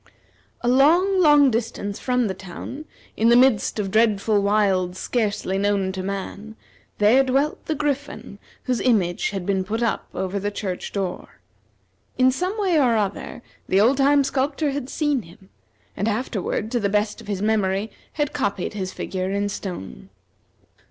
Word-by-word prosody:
A 240 - -2
long, 340 +10 +4
long 295 -4 +6
distance 220 -3 -3
from 250 -1 +1
the 195 - -1
town, 195 - -8 0.3
in 225 +1 +3
the 235 - +6
midst 245 -5 +3
of 200 -2 -2
dreadful 215 -1 +2
wilds 195 -3 +1
scarcely 205 -5 -1
known 200 -2 +1
to 190 0 -5
man, 200 +3 -5 0.4
there 225 +6 +5
dwelt 270 +3 0
the 315 - 0
Griffin 285 -7 -3 0.2
whose 250 -2 -1
image 190 -8 +1
had 195 -3 -5
been 190 -1 0
put 220 +5 -2
up 230 - -1
over 190 +1 -2
the 205 +1 -2
church 195 -3 -5
door. 195 -3 -5 0.8
In 255 0 +5
some 365 +10 -2
way 365 -6 +2
or 240 -5 +3
other, 205 +3 -3 0.3
the 190 - +3
old 240 +6 +4
time 280 +1 +4
sculptor 280 +2 -1
had 275 -2 -4
seen 295 -4 0
him, 190 +2 -17 0.5
and 205 - -2
afterward, 220 -1 -2
to 245 - +1
the 200 -2 0
best 210 +1 0
of - - -14
his 200 -1 -3
memory, 210 -1 0 0.2
had 295 -2 -1
copied 200 -11 -2
his 190 -3 -4
figure 185 -1 -4
in 200 +1 -1
stone. 175 - -7
215 Hz, 165 wpm, -23 LUFS, 195-265 Hz, 0.8 s, long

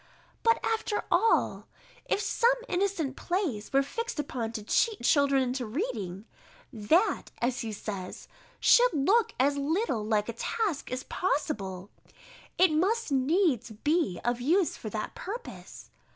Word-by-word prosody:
But 460 0 +3
after 445 -2 -1
all, 455 - +2 0.4
if - - 0
some 475 +3 +2
innocent 355 - -1
plays 335 - -2
were 275 0 +4
fixed 460 - -4
upon 245 -6 -3
to 215 -2 -5
cheat 430 - +1
children 280 -2 +4
into 255 0 -2
reading, 215 - -4 0.5
that, 315 - +1
as 245 +1 0
he 225 - -4
says, 200 -3 -6 0.3
should - - +5
look 390 +11 +2
as 280 +2 +3
little 285 - 0
like 210 -1 0
a 235 - -4
task 405 - -2
as 255 +1 -3
possible, 200 - -2 0.7
it 370 -2 +5
must 385 +6 +1
needs 275 - +2
be 285 - 0
of 240 0 0
use 340 +7 +2
for 215 - -7
that 215 +1 -4
purpose. 455 +6 -8
280 Hz, 135 wpm, -28 LUFS, -, 0.7 s, should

